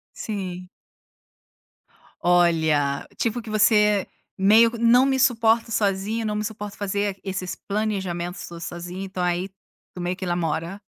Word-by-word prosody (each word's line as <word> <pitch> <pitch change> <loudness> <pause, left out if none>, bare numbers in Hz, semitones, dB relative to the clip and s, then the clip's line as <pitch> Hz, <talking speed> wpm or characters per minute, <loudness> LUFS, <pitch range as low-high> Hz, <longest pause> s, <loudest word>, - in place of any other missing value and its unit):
Sim. 185 -4 -5 1.5
Olha, 160 -5 +2
tipo 235 +1 -1
que 225 - -11
você 210 -2 +4 0.3
meio 220 +4 +6
que 235 - -6
não 240 +3 +5
me 265 -1 +1
suporta 230 -2 +3
sozinha, 210 +1 0
não 210 -1 -1
me 210 0 -2
suporto 210 -2 -6
fazer 200 0 -2
esses 185 -2 -4
planejamentos 190 -4 -3
todo 170 -1 -9
sozinho, 175 +3 -6
então 190 -1 -4
aí 180 +2 0 0.5
tu 180 - -7
meio 175 +1 -2
que 190 - -5
namora. 170 +2 -2
195 Hz, 135 wpm, -24 LUFS, 175-220 Hz, 1.5 s, meio